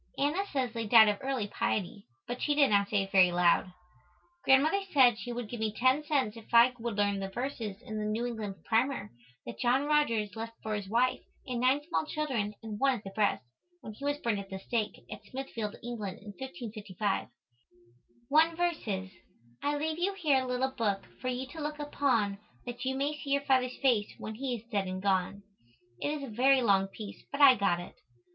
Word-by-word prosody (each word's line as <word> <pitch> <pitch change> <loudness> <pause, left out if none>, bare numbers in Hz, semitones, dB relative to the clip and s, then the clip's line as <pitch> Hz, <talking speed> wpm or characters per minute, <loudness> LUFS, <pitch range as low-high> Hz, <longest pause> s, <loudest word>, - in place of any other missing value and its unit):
Anna 305 +8 +1
says 255 -5 -1
they 230 -2 -3
died 220 -1 +8
of 205 - -1
"early 265 -5 -1
piety," 200 0 -2 0.2
but 245 +1 -5
she 295 - +1
did 280 -5 +4
not 200 -1 +3
say 205 -2 +2
it 195 - -9
very 185 -2 +6
loud. 175 +1 +3 0.7
Grandmother 300 +9 +4
said 245 -6 +5
she 245 - -5
would 240 -1 -4
give 235 +2 -6
me 220 -1 0
10 255 +7 +2
cents 270 -8 0
if 225 -1 -13
I 235 +2 +7
would 230 -2 -3
learn 200 -1 +1
the 195 0 -4
verses 230 -3 -4
in 215 -1 -5
the 210 - -2
New 220 +3 -1
England 220 -5 -4
Primer 230 - 0 0.3
that 115 - -8
John 255 +3 +2
Rogers 230 -9 +1
left 225 +1 -5
for 220 - -2
his 205 -2 -4
wife 245 +4 +2 0.2
and 250 -2 -3
nine 260 +4 +3
small 335 -2 -1
children 250 -10 -2
and 215 -2 -6
one 270 -1 +3
at 215 - -12
the 195 - -7
breast, 205 -10 0 0.4
when 215 - -8
he 245 - -13
was 285 0 0
burned 230 -7 -1
at 195 -1 -8
the 190 - -5
stake, 215 +2 -3
at - - -8
Smithfield, 230 -4 -5
England, 215 -6 -5
in 205 - -12
1555. 215 -6 -3 1.0
One 315 +4 +4
verse 345 -1 0
is, 190 -2 -3 0.5
"I 290 0 0
leave 315 +2 -2
you 390 +3 0
here 295 -8 +2
a - - -5
little 250 +1 0
book 215 -6 -1 0.2
for 255 - -4
you 255 +1 -2
to 320 - -7
look 300 0 -3
upon 250 -9 0 0.3
that 245 +1 -6
you 265 0 0
may 285 +3 -1
see 280 - -7
your 280 0 +1
father's 255 -2 +1
face 235 -6 +3
when 220 - -6
he 250 +2 -3
is 225 - -9
dead 200 -3 0
and 185 0 -4
gone." 195 +1 0 0.6
It - - 0
is 295 -1 -3
a - - -5
very 260 +1 +4
long 195 -3 +3
piece 205 +1 -9
but 280 - -4
I 280 -3 +9
got 195 -6 +1
it. 175 - -9
235 Hz, 210 wpm, -30 LUFS, 205-270 Hz, 1.0 s, I